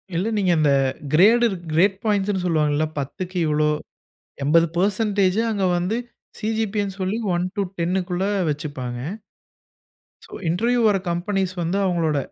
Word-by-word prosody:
இல்ல 185 +6 0
நீங்க 185 -3 +2
அந்த 150 -2 +3 0.4
கிரேடு 230 +8 +6 0.3
கிரேட் 190 +4 +3
பாயிண்ட்ஸ்னு 200 -3 +1
சொல்வாங்கல்ல. 155 -2 +1
10க்கு 180 +7 -5
இவ்வளோ 150 0 +2 0.8
80% 190 +6 +2
அங்க 200 -3 0
வந்து 185 +6 -1 0.4
சி.ஜி.பி. 220 -1 -1
எ - - -2
னு 190 - -9
சொல்லி 190 +4 -1 0.2
1 175 +1 0
டூ 200 - 0 0.2
10க்குள்ள 180 +1 -1 0.2
வெச்சுப்பாங்க. 135 -5 -4 1.3
சோ - - -20 0.2
இன்டர்வியூ 235 +8 +1
வர்ற 200 -2 +3
கம்பெனிஸ் 185 +1 -1
வந்து 170 +4 -1
அவங்களோட 165 -5 +1
185 Hz, 125 wpm, -22 LUFS, 165-205 Hz, 1.3 s, கிரேடு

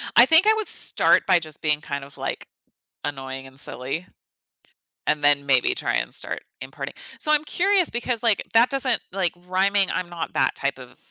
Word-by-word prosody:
I 240 - +9
think 325 +8 +5
I 435 - +6
would 440 -1 -3
start - - +3
by 185 -2 +4
just 155 -2 -9
being 150 -1 0
kind 140 -2 -5
of, 140 0 -14
like, - - -5 0.6
annoying 135 -2 -6
and 135 +1 -4
silly, 135 +8 -2 1.0
and 150 -1 0
then 145 -1 +4
maybe 130 -3 +3
try - - -2
and - - -2
start - - -3 0.2
imparting - - -7 0.2
So, 305 - 0
I'm 300 0 +3
curious 375 +2 +2
because, 240 0 -2
like, 225 -3 +3
that 230 +2 +5
doesn't 270 -1 0
like, 185 -2 0
rhyming 195 +1 +2
I'm 180 -1 -3
not 170 -2 -6
that 130 0 +1
type 140 -1 -2
of 125 -1 -13
175 Hz, 190 wpm, -23 LUFS, -, 1.0 s, I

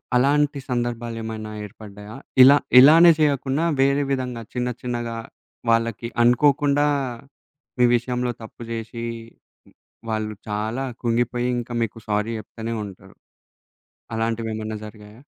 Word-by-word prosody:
అలాంటి 140 +3 +2
సందర్భాలేమైనా 115 -3 -3
ఏర్పడ్డాయా? 105 +1 -11 0.3
ఇలా 140 +2 +8 0.2
ఇలానే 165 +6 +8
చేయకున్నా 145 0 +1 0.2
వేరే 140 +1 +3
విధంగా 125 -3 -2
చిన్న, 125 0 -1
చిన్నగా 120 -2 -3 0.5
వాళ్ళకి 115 0 +1 0.2
అనుకోకుండా, 145 +4 +3 0.9
మీ 125 - +5
విషయంలో 125 +1 -1
తప్పు 110 +1 -12
జేసి, 115 +1 -5 1.1
వాళ్ళు 110 -1 -2 0.2
చాలా 110 +5 -2 0.2
కుంగిపోయి 120 +1 0
ఇంకా 120 0 -7
మీకు 115 0 -5
సారీ 105 +2 0
జెప్తనే 115 +1 -6
ఉంటరు. 95 -2 -13 1.0
అలాంటివేమన్నా 110 -1 -3
జరిగాయా? 105 +3 -13
120 Hz, 100 wpm, -23 LUFS, 110-130 Hz, 1.1 s, ఇలా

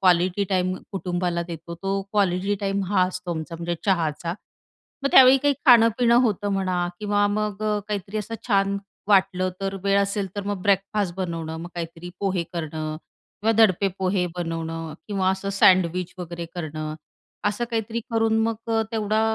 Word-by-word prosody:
Quality 185 +1 +3
time 185 -1 +1 0.2
कुटुंबाला 175 -2 -1
देतो. 170 0 -7
तो 195 +3 -2
क्वालिटी 195 0 +1
टाईम 195 0 0
हा 185 - +4
असतो 180 -1 -6
आमचा 160 +1 -5
म्हणजे 170 +1 -2
चहाचा. 170 -3 0 0.7
मग 275 - +2
त्यावेळी 260 0 +9
काही 285 +1 +2
खाणं-पिणं 235 0 +6
होतं 205 -4 0
म्हणा 190 -2 0 0.2
किंवा 205 -1 +2
मग 210 0 -2
अ, 210 -1 +1
काहीतरी 205 0 -3
असं 220 +2 -5
छान 200 -1 +2 0.3
वाटलं 190 -2 +3
तर 195 0 -2
वेळ 200 0 +3
असेल 200 -1 -2
तर 205 - -2
मग 200 -3 -3
ब्रेकफास्ट 200 -1 +1
बनवणं. 165 -3 -3
मग 170 +2 -7
काहीतरी 170 +1 -6
पोहे 190 -3 0
करणं 155 -2 -4 0.4
किंवा 225 +2 +3
दडपे 200 -3 +4
पोहे 185 -1 +1
बनवणं 165 -2 -4
किंवा 195 -2 +1
असं 190 +1 -2
सँडविच 180 -2 +4
वगैरे 170 -1 -6
करणं. 155 -2 -4 0.5
असं 205 +3 0
काहीतरी 230 0 -2
करून 225 -1 +2
मग 225 0 +1 0.2
अ, 225 - +3
तेवढा 215 -1 +1
190 Hz, 160 wpm, -24 LUFS, 175-205 Hz, 0.7 s, त्यावेळी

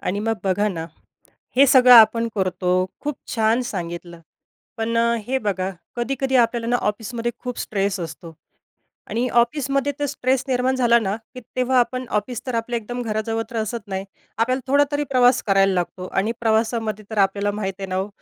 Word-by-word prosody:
आणि 200 +3 -2
मग 225 +1 0
बघा 200 +2 +1
ना, 165 -4 -4 0.7
हे 275 +1 +7
सगळं 255 -1 +7
आपण 230 0 +7
करतो. 185 -2 -1 0.3
खूप 295 -2 -3 0.2
छान 225 +1 +2
सांगितलं. 170 -2 -6 0.6
पण 230 0 -1 0.3
हे 265 +1 0
बघा 195 -5 -2 0.3
कधी-कधी 265 +2 0
आपल्याला 235 -1 +2
ना 245 - +3
ऑफिसमध्ये 230 +3 -3
खूप 250 -1 -6
स्ट्रेस 200 -1 -1
असतो 165 0 -8 0.8
आणि 240 +2 0
ऑफिसमध्ये 275 +2 0
तर 290 - 0
स्ट्रेस 265 -2 0
निर्माण 255 0 +1
झाला 235 -2 +4
ना, 200 -2 -1 0.2
की 255 - -7 0.2
तेव्हा 255 0 +2
आपण 255 +1 -1
ऑफिस 235 +3 -7
तर 245 - -2
आपलं 230 +1 -2
एकदम 240 +2 -4
घराजवळ 225 0 -2
तर 235 - -7
असत 220 -1 -3
नाही. 190 0 -4 0.3
आपल्याला 255 +3 +1
थोडा 285 +1 +6
तरी 290 0 0
प्रवास 250 0 +4
करायला 195 0 +4
लागतो 180 +1 -3
आणि 205 +5 0
प्रवासामध्ये 220 -1 0
तर 220 - -6
आपल्याला 200 +1 +2
माहीत 195 -2 -3
आहे 195 - -4
ना 185 - -2
हो, 190 +1 -1
225 Hz, 175 wpm, -22 LUFS, 200-250 Hz, 0.8 s, हे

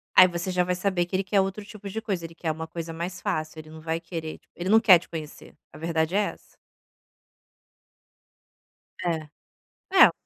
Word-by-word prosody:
Aí 185 - +10
você 175 +1 -3
já 180 0 +2
vai 180 0 0
saber 180 -1 +1
que 175 - -4
ele 190 - +1
quer 195 +1 +3
outro 195 +2 -3
tipo 205 -1 -9
de 220 +3 -4
coisa, 195 -6 -2
ele 165 0 -10
quer 165 -2 -1
uma 160 +1 -5
coisa 165 0 -5
mais 170 +1 -5
fácil, 155 0 -2
ele 155 0 -10
não 160 0 -10
vai 165 +1 -1
querer, 165 -2 -6
tipo, - - -37
ele 175 +2 -3
não 220 +2 +7
quer 190 -6 +8
te - - -16
conhecer, 155 -3 -8 0.2
a - - -12
verdade 165 +2 0
é - - +5
essa. - - -16 2.6
É, 160 -3 -1 0.7
é. - - +9
175 Hz, 200 wpm, -26 LUFS, 160-190 Hz, 2.6 s, Aí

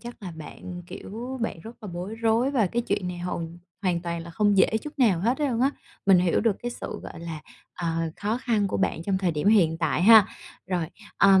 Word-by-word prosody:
chắc 240 -2 -10
là 180 - -5
bạn, 175 +3 -9
kiểu, 245 +9 -7
bạn 225 -7 -3
rất 225 +2 -10
là 210 - -6
bối 180 +5 -5
rối 230 +3 +2
và 245 -7 +2
cái 240 +6 -1
chuyện 205 -5 -1
này 180 -1 -5
hầu 175 -1 -3 0.4
hoàn 180 -3 +1
toàn 170 -1 -3
là 170 - -9
không 205 +3 +2
dễ 190 - +6 0.2
chút 300 -1 -9
nào 210 -10 +4
hết 240 - +1
luôn 260 -6 0
á. 270 +2 +4 0.4
Mình 195 -2 +7
hiểu 175 -1 +2
được 215 -3 +2
cái 240 - -2
sự, - - -6
gọi 165 - -9
là, 165 -2 -6 0.3
ờ, 175 - -4 0.3
khó 215 +4 -1
khăn 220 -5 +1
của - - -1
bạn 165 - 0
trong 190 +1 0
thời 185 -2 +1
điểm 155 +4 0
hiện 170 -7 +4
tại 170 +1 +1
ha. 220 0 +9 0.4
Rồi, 180 -3 -1 0.3
ừm, 195 -1 +7
195 Hz, 230 wpm, -26 LUFS, 175-230 Hz, 0.4 s, ha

